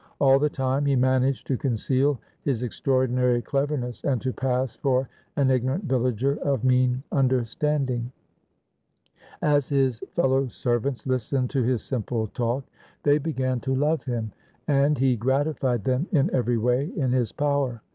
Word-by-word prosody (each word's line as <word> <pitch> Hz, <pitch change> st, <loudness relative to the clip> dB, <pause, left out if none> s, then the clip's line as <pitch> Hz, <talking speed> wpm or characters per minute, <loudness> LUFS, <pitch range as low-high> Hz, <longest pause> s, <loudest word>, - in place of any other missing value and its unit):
All 135 Hz, -1 st, +5 dB
the 150 Hz, +1 st, +2 dB
time 135 Hz, +1 st, -1 dB
he 140 Hz, -, +3 dB
managed 130 Hz, +1 st, +2 dB
to 130 Hz, -, -1 dB
conceal 130 Hz, +2 st, +1 dB, 0.2 s
his 125 Hz, -4 st, -1 dB
extraordinary 125 Hz, 0 st, +1 dB
cleverness, 135 Hz, -2 st, -2 dB
and 135 Hz, -4 st, +1 dB
to 130 Hz, -, -1 dB
pass 130 Hz, -1 st, -1 dB
for 130 Hz, -1 st, 0 dB, 0.3 s
an 140 Hz, -2 st, +2 dB
igno 130 Hz, -1 st, +2 dB
rant 145 Hz, +10 st, -1 dB
villager 130 Hz, -, 0 dB
of 135 Hz, -4 st, 0 dB
mean 125 Hz, 0 st, +2 dB
understanding. 130 Hz, -1 st, 0 dB, 1.3 s
As 145 Hz, -3 st, +2 dB
his 135 Hz, -4 st, +1 dB, 0.2 s
fellow 135 Hz, -4 st, +2 dB
servants 120 Hz, +2 st, -2 dB
listened 130 Hz, 0 st, -1 dB
to 135 Hz, -, +1 dB
his 125 Hz, -1 st, 0 dB
simple 115 Hz, -3 st, -2 dB
talk, 120 Hz, +5 st, -2 dB, 0.4 s
they 145 Hz, +1 st, +4 dB
began 130 Hz, -5 st, -1 dB
to 130 Hz, +1 st, -1 dB
love 150 Hz, +4 st, +1 dB
him 115 Hz, -4 st, -3 dB, 0.4 s
and 145 Hz, +1 st, +3 dB
he 130 Hz, 0 st, +3 dB
gratified 130 Hz, -1 st, 0 dB
them 130 Hz, +6 st, 0 dB
in 145 Hz, -6 st, +2 dB
every 120 Hz, -2 st, +1 dB
way 125 Hz, +5 st, +1 dB
in 135 Hz, -7 st, 0 dB
his 125 Hz, -4 st, +1 dB
power. 140 Hz, -6 st, -1 dB
130 Hz, 150 wpm, -25 LUFS, 125-140 Hz, 1.3 s, All